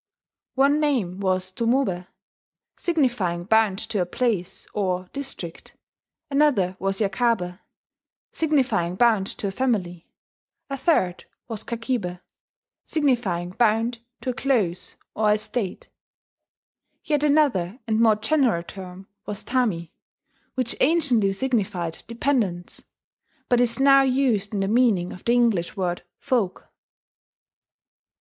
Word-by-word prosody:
One 280 +3 +4
name 240 -12 0
was 185 -1 0
tomobe, 230 -5 0 0.7
signifying 240 - 0
bound 220 0 +3
to 205 -4 +1
a - - +1
place, 195 -3 -2
or 185 -3 -1
district; 265 -12 -7 0.5
another 275 -11 +3
was 195 0 -1
yakabe, 195 -3 0 0.7
signifying 270 - +1
bound 215 -3 +3
to 200 - -2
a - - -2
family; 190 -8 -1 0.6
a - - 0
third 225 - +1 0.2
was 225 -4 -5
kakibe, 230 -6 -3 0.6
signifying 235 - 0
bound 230 +2 +1 0.2
to 255 - -1
a - - -6
close, 220 -10 0 0.2
or 210 -1 +3
estate; 210 -1 -3 1.1
yet 295 -2 0
another 275 - +2
and 220 -2 +1
more 225 -2 +5
general 235 - +1
term 185 +1 -10 0.2
was 205 -1 -5
tami, 215 -11 0 0.6
which 255 -2 -1
anciently 260 -10 +3
signified 195 -7 -2
"dependants," 230 -8 -1 0.6
but 245 -1 +4
is 245 +1 +1
now 275 0 +7
used 255 -6 +1
in 205 -2 -1
the 195 - 0
meaning 215 -6 +2
of 180 - -12
the 235 - +3
English 225 -9 +2
word 175 -2 -1 0.2
"folk." 235 -9 -1
220 Hz, 115 wpm, -24 LUFS, 185-255 Hz, 1.1 s, now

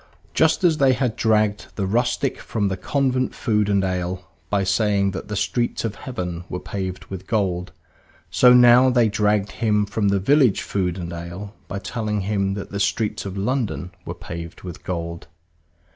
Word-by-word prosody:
Just 160 +3 +3
as 165 -3 +3
they 135 -2 +5
had 125 -3 -1
dragged 110 -2 +1
the 100 - -1
rustic 120 +6 0
from 105 -3 -1
the 95 - -1
convent 130 +5 0
food 105 -4 +1
and 100 -1 +2
ale 90 0 -2 0.2
by 100 -1 +1
saying 100 0 +2
that 95 - -6
the 105 - -4
streets 120 +3 -1
of 110 - -2
heaven 90 -11 -5
were 90 - -3
paved 95 -2 -5
with 95 -1 -8
gold, 95 -5 -1 0.6
so 125 - +6
now 125 +1 +7
they 120 -3 +3
dragged 105 -1 +1
him 105 -1 +1
from 100 +1 -1
the 100 0 +2
village 130 +1 +3
food 90 -3 -1
and 85 -1 -5
ale 85 +4 -7
by 95 - -4
telling 105 +1 -2
him 100 -1 0
that 100 - -6
the 100 - -3
streets 100 +1 -1
of 95 0 -6
London 105 -4 -1
were - - -6
paved 85 0 -8
with 90 -2 -8
gold. 85 -1 -4
100 Hz, 175 wpm, -22 LUFS, 95-115 Hz, 0.6 s, now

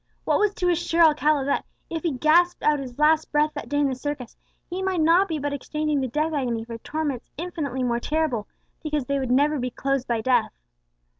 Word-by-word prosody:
What - - +2
was 420 -1 +2
to 360 - -1
assure 340 0 +2
Alcala 300 -2 +3
that, 280 - 0 0.2
if 325 -1 -4
he 335 - 0
gasped 335 +6 +3
out 300 -1 +3
his 255 -3 -8
last 310 +1 +3
breath 300 +1 +2
that - - -7
day 290 - -1
in 290 -1 +3
the 265 - -1
circus, 265 -1 -5 0.3
he 360 +2 -4
might 380 -2 0
not 340 +5 +4
be 320 -4 -2
but 290 0 -3
exchanging 300 +1 -1
the 260 - -1
death 305 +6 -1
agony 240 -6 -1
for 230 -1 -7
torments 295 -2 -4
infinitely 295 -6 -3
more 240 -1 0
terrible, 295 -6 -1 0.3
because 300 -4 -2
they 280 +1 0
would 260 -2 -3
never 290 +4 +3
be 250 0 -2
closed 275 +1 -2
by 235 -2 0
death? 245 -1 +2
295 Hz, 215 wpm, -24 LUFS, 260-315 Hz, 0.3 s, not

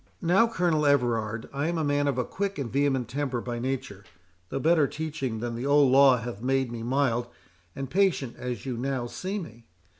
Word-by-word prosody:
Now, 185 +7 +4
Colonel 175 -9 +1
Everard, 115 -5 +1
I 140 +3 -1
am 170 0 -1
a 160 - 0
man 145 0 +1
of 140 - 0
a 125 - 0
quick 200 0 -3
and 130 -5 -4
vehement 135 -3 +1
temper 130 0 -2
by 120 0 -4
nature, 120 -6 -4 0.5
though - - -3
better 155 +1 +3
teaching 145 -8 -4
than 120 0 -3
the 120 +4 -3
old 140 -2 +5
law 135 -1 +7
hath 115 -3 -6
made 130 0 0
me 115 -1 -5
mild 120 -1 0 0.5
and 135 0 -4
patient 175 -6 +1
as 125 -3 -5
you 125 -3 -3
now 130 0 -2
see 190 - -4
me. 120 - -9
135 Hz, 200 wpm, -27 LUFS, 120-145 Hz, 0.5 s, law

